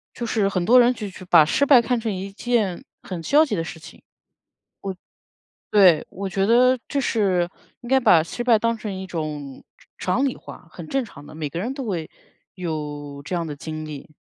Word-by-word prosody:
就 240 Hz, -, -4 dB
是 210 Hz, -3 st, +1 dB
很 185 Hz, -3 st, -1 dB
多 250 Hz, +5 st, +7 dB
人 245 Hz, +1 st, +5 dB
就 215 Hz, -4 st, -6 dB, 0.2 s
把 165 Hz, -3 st, +7 dB
失 280 Hz, -, +2 dB
败， 265 Hz, -4 st, +7 dB
看 240 Hz, 0 st, 0 dB
成 225 Hz, -2 st, -2 dB
一 195 Hz, +1 st, -5 dB
件 210 Hz, -4 st, -1 dB, 0.2 s
很 180 Hz, -3 st, -6 dB
消 295 Hz, -, +4 dB
极 255 Hz, -, -2 dB
的 165 Hz, -, -1 dB
事 165 Hz, 0 st, -8 dB
情。 -, -, -14 dB, 1.7 s
我 -, -, +1 dB
对， 180 Hz, -6 st, +6 dB
我 195 Hz, 0 st, -5 dB
觉 195 Hz, +1 st, 0 dB
得 250 Hz, +4 st, +5 dB
这 280 Hz, -, -1 dB
是 190 Hz, -8 st, +1 dB, 0.3 s
应 240 Hz, -, -9 dB
该 265 Hz, 0 st, +5 dB
把 180 Hz, -10 st, +5 dB
失 240 Hz, +8 st, -5 dB
败 240 Hz, -2 st, +5 dB
当 230 Hz, +1 st, 0 dB
成 210 Hz, -2 st, -5 dB
一 190 Hz, 0 st, -6 dB
种 150 Hz, -6 st, -6 dB, 0.3 s
常 185 Hz, -, -1 dB
常 275 Hz, -, +2 dB
理 265 Hz, -, -1 dB
化， 180 Hz, -, -12 dB
很 170 Hz, -3 st, -9 dB
正 270 Hz, -1 st, 0 dB
常 145 Hz, -9 st, -13 dB
的 155 Hz, -, -12 dB
每 155 Hz, -2 st, -4 dB
个 170 Hz, -, -5 dB
人 240 Hz, +8 st, -3 dB
都 270 Hz, -3 st, -6 dB
会， 170 Hz, -7 st, -3 dB, 0.5 s
有 150 Hz, -5 st, -5 dB
这 180 Hz, -, -4 dB
样 170 Hz, -, -1 dB
的 150 Hz, -2 st, -5 dB
经 155 Hz, +1 st, -6 dB
历。 150 Hz, 0 st, -9 dB
190 Hz, 225 characters per minute, -23 LUFS, 160-235 Hz, 1.7 s, 多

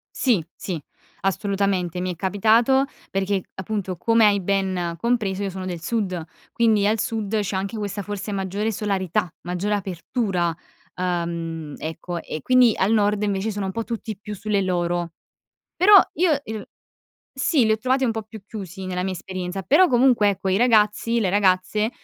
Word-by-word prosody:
Sì. 225 Hz, -, +2 dB
Sì. 180 Hz, -4 st, -4 dB, 0.4 s
Assolutamente. 195 Hz, -2 st, 0 dB
Mi 185 Hz, 0 st, -1 dB
è -, -, -6 dB
capitato 225 Hz, -, +3 dB, 0.2 s
perché 195 Hz, 0 st, 0 dB
appunto, 190 Hz, -1 st, -3 dB
come 230 Hz, +4 st, +4 dB
hai 205 Hz, -1 st, +4 dB
ben 185 Hz, -3 st, -1 dB
compreso, 215 Hz, -5 st, 0 dB
io 200 Hz, -, -1 dB
sono 190 Hz, 0 st, -6 dB
del 175 Hz, -3 st, -5 dB
sud, 190 Hz, -3 st, -2 dB, 0.3 s
quindi 220 Hz, -3 st, +3 dB
al 215 Hz, +2 st, +2 dB
sud 220 Hz, -1 st, -1 dB
c'è 200 Hz, -1 st, -2 dB
anche 195 Hz, +4 st, -3 dB
questa 205 Hz, -1 st, -3 dB
forse 205 Hz, +1 st, -5 dB
maggiore 200 Hz, +2 st, -2 dB
solarità, 190 Hz, -5 st, -1 dB
maggiore 180 Hz, +4 st, -2 dB
apertura. 185 Hz, -2 st, -2 dB, 0.4 s
Ehm, 170 Hz, -3 st, -3 dB
ecco, 165 Hz, +2 st, -5 dB
e 155 Hz, -, -6 dB
quindi 255 Hz, -3 st, +5 dB
al 190 Hz, +3 st, +2 dB
nord 210 Hz, -1 st, +2 dB
invece 205 Hz, +1 st, -1 dB
sono 205 Hz, -1 st, -3 dB
un -, -, -2 dB
po' 230 Hz, +4 st, -3 dB
tutti 225 Hz, -3 st, -5 dB
più 210 Hz, 0 st, -7 dB
sulle 205 Hz, 0 st, 0 dB
loro. 175 Hz, -2 st, -1 dB, 0.6 s
Però 410 Hz, +3 st, +6 dB, 0.2 s
io 345 Hz, +1 st, +3 dB
er 220 Hz, -1 st, -6 dB, 0.7 s
sì, 270 Hz, 0 st, +2 dB
li 220 Hz, -, +3 dB
ho 220 Hz, -, +1 dB
trovati 260 Hz, +4 st, +1 dB
un 245 Hz, -, +2 dB
po' 220 Hz, -1 st, -4 dB
più 220 Hz, -1 st, -11 dB
chiusi 195 Hz, -3 st, -7 dB
nella 180 Hz, -1 st, -2 dB
mia 190 Hz, 0 st, -2 dB
esperienza, 185 Hz, +1 st, -5 dB
però 305 Hz, -, +5 dB
comunque, 245 Hz, -4 st, +4 dB
ecco, 195 Hz, -1 st, -1 dB
i 190 Hz, -, +2 dB
ragazzi, 230 Hz, 0 st, +3 dB
le 200 Hz, -5 st, +1 dB
ragazze, 200 Hz, +2 st, +2 dB
200 Hz, 170 wpm, -23 LUFS, 185-220 Hz, 0.7 s, Però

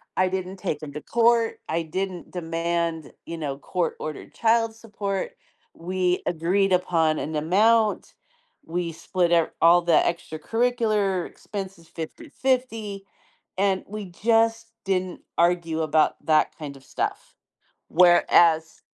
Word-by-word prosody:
I 185 Hz, 0 st, +2 dB
didn't 185 Hz, 0 st, -4 dB
take 165 Hz, -6 st, -3 dB
him 150 Hz, -2 st, -8 dB
to 150 Hz, -, -6 dB
court. 230 Hz, +2 st, +2 dB
I 165 Hz, +1 st, 0 dB
didn't 185 Hz, +2 st, -4 dB
demand, 165 Hz, -1 st, -2 dB
you 165 Hz, 0 st, -6 dB
know, 140 Hz, -3 st, -4 dB
court-ordered 155 Hz, -1 st, -4 dB
child 225 Hz, 0 st, +2 dB
support. 205 Hz, -3 st, -4 dB, 0.4 s
We 180 Hz, +1 st, -1 dB
agreed 185 Hz, +4 st, +1 dB
upon 165 Hz, -3 st, +2 dB
an 155 Hz, -, -4 dB
amount. 210 Hz, +8 st, +2 dB, 0.5 s
We 170 Hz, 0 st, -3 dB
split 175 Hz, +1 st, 0 dB
up 165 Hz, -1 st, +3 dB
all 170 Hz, +1 st, +7 dB
the 170 Hz, 0 st, +1 dB
extracurricular 205 Hz, +3 st, 0 dB
expenses 190 Hz, -5 st, -8 dB
50/50, 225 Hz, -, -3 dB, 0.5 s
and 195 Hz, -1 st, +1 dB
we 210 Hz, 0 st, -6 dB
just 225 Hz, +3 st, +2 dB, 0.2 s
didn't 185 Hz, -2 st, -1 dB, 0.2 s
argue 170 Hz, -2 st, +2 dB
about 155 Hz, 0 st, +2 dB
that 155 Hz, -1 st, +2 dB
kind 145 Hz, -3 st, -7 dB
of 135 Hz, -, -18 dB
stuff, -, -, -4 dB, 0.5 s
whereas 170 Hz, -2 st, +4 dB
180 Hz, 120 wpm, -25 LUFS, 165-205 Hz, 0.5 s, all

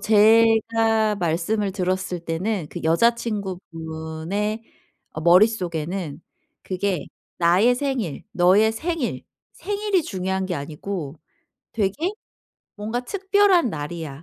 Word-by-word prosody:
제가 225 Hz, 0 st, +4 dB
말씀을 185 Hz, +4 st, 0 dB
들었을 185 Hz, -1 st, -2 dB
때는 175 Hz, +1 st, -2 dB
그 175 Hz, -, -6 dB
여자친구분의 185 Hz, -1 st, -1 dB, 0.5 s
어 155 Hz, -, -5 dB
머릿속에는 175 Hz, -4 st, +2 dB, 0.4 s
그게 185 Hz, -3 st, -2 dB, 0.3 s
'나의 180 Hz, +8 st, +4 dB
생일, 250 Hz, -, -2 dB
너의 190 Hz, +5 st, +4 dB
생일, 315 Hz, +2 st, -3 dB, 0.3 s
생일이 410 Hz, -2 st, -1 dB
중요한 190 Hz, -5 st, -2 dB
게 185 Hz, -, -2 dB
아니고 155 Hz, +1 st, -5 dB, 0.6 s
되게 230 Hz, -, 0 dB, 0.7 s
뭔가 220 Hz, +4 st, -3 dB
특별한 390 Hz, 0 st, +3 dB
날이야. 155 Hz, -2 st, -6 dB
195 Hz, 225 characters per minute, -23 LUFS, 170-225 Hz, 0.7 s, 제가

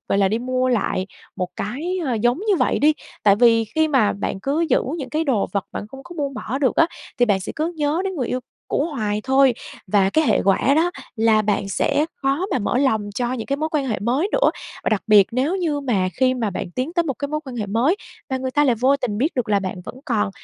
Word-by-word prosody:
gọi 195 Hz, -, +2 dB
là, 195 Hz, -1 st, +4 dB
đi 220 Hz, +3 st, 0 dB
mua 255 Hz, +1 st, 0 dB
lại 205 Hz, -6 st, 0 dB, 0.3 s
một 180 Hz, -1 st, -2 dB
cái, 315 Hz, -, -3 dB
ơ, 255 Hz, -, 0 dB
giống 240 Hz, +4 st, +1 dB
như 410 Hz, 0 st, +1 dB
vậy 255 Hz, -, +1 dB
đi, 300 Hz, +2 st, +5 dB, 0.3 s
tại 200 Hz, -1 st, +5 dB
vì 230 Hz, -1 st, +5 dB
khi 315 Hz, +9 st, 0 dB
mà 260 Hz, -8 st, +3 dB
bạn 200 Hz, -1 st, -4 dB
cứ 280 Hz, +8 st, 0 dB
giữ -, -, +4 dB, 0.2 s
những 260 Hz, -4 st, -6 dB
cái 315 Hz, +3 st, 0 dB
đồ 240 Hz, -8 st, +1 dB
vật 200 Hz, -, -1 dB
bạn 205 Hz, -, -5 dB
không 270 Hz, +4 st, -11 dB
có 350 Hz, -, -11 dB
buông 280 Hz, -2 st, -2 dB
bỏ 250 Hz, +2 st, -4 dB
được 265 Hz, -4 st, +1 dB
á, 330 Hz, -, +5 dB, 0.3 s
thì 245 Hz, -, +5 dB
bạn 200 Hz, -3 st, +2 dB
sẽ -, -, -5 dB
cứ 320 Hz, +3 st, -1 dB
nhớ 300 Hz, +2 st, 0 dB
đến 385 Hz, -1 st, -2 dB
người 255 Hz, -6 st, -2 dB
yêu 255 Hz, -, -1 dB, 0.3 s
cũ 290 Hz, -, 0 dB
hoài 215 Hz, -9 st, -2 dB
thôi, 265 Hz, -1 st, +4 dB, 0.3 s
và 195 Hz, 0 st, +3 dB
cái 315 Hz, +5 st, +2 dB
hệ 220 Hz, -, +3 dB
quả 200 Hz, +8 st, +3 dB
đó 335 Hz, +3 st, +3 dB, 0.3 s
là 220 Hz, -1 st, +3 dB
bạn 205 Hz, -1 st, 0 dB
sẽ 285 Hz, +9 st, +1 dB, 0.2 s
khó 275 Hz, +8 st, +1 dB
mà 260 Hz, -, +1 dB
mở 240 Hz, +3 st, 0 dB
lòng 220 Hz, -7 st, +1 dB
cho 245 Hz, +2 st, -1 dB
những 230 Hz, -4 st, -4 dB
cái 275 Hz, -, -1 dB
mối 310 Hz, +2 st, -1 dB
quan 285 Hz, -3 st, 0 dB
hệ 220 Hz, -, -1 dB
mới 260 Hz, -, 0 dB
nữa. -, -, +4 dB, 0.3 s
Và -, -, +2 dB
đặc 215 Hz, -3 st, +1 dB
biệt 210 Hz, -3 st, +7 dB
nếu 275 Hz, +9 st, +1 dB
như 320 Hz, -6 st, -1 dB
mà 210 Hz, -9 st, 0 dB
khi 255 Hz, 0 st, +4 dB
mà 225 Hz, -4 st, -1 dB
bạn 175 Hz, -, -5 dB
tiến 255 Hz, -, -3 dB
tới 345 Hz, -1 st, +2 dB
một 295 Hz, -5 st, -2 dB
cái 285 Hz, -, -3 dB
mối 305 Hz, +1 st, -2 dB
quan 260 Hz, -3 st, -7 dB
hệ 215 Hz, -3 st, -2 dB
mới 240 Hz, -, +2 dB, 0.3 s
và 265 Hz, -, 0 dB
người 260 Hz, 0 st, -3 dB
ta 290 Hz, +3 st, +3 dB
lại 255 Hz, -4 st, +3 dB
vô 260 Hz, +5 st, +3 dB
tình 210 Hz, -6 st, -3 dB
biết 290 Hz, +8 st, 0 dB
được 250 Hz, -4 st, -1 dB
là 205 Hz, -1 st, +3 dB
bạn 185 Hz, -1 st, -4 dB
vẫn -, -, -7 dB
còn, 215 Hz, -7 st, 0 dB
255 Hz, 265 wpm, -21 LUFS, 215-290 Hz, 0.3 s, biệt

